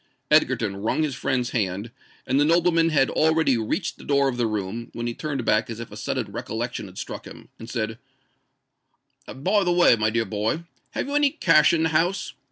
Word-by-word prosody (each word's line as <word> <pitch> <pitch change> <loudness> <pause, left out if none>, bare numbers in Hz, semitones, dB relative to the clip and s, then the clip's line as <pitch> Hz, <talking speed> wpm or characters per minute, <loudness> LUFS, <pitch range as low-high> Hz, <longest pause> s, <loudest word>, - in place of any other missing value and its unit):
Egerton 100 -1 +3
wrung 110 +10 0
his 150 -3 -1
friend's 125 -1 -1
hand; 100 0 -2 0.3
and 130 +2 +1
the - - +5
nobleman 165 +1 +3
had 145 -4 +2
already 160 -3 +3
reached 115 - -2
the - - -11
door 140 -1 +2
of 130 - -1
the 120 -2 +1
room, 110 +2 -4
when 120 0 -4
he 120 - -2
turned 140 -3 -4
back 110 +1 +2
as 115 -1 -6
if 115 - -8
a - - -9
sudden - - -3
recollection 115 -1 -4
had 95 0 -14
struck - - -6
him, - - -13
and 115 - -9
said, 115 -2 -3 1.3
"By 190 +10 0
the 175 - +1
way, 175 -8 +5
my 110 -1 +1
dear 115 +1 0
boy, 110 +10 -2 0.3
have - - -2
you 285 - -4
any 290 -1 +4
cash 155 - +4
in 160 -1 +1
the 160 - +2
house? 170 +5 0
130 Hz, 205 wpm, -24 LUFS, 110-160 Hz, 1.3 s, the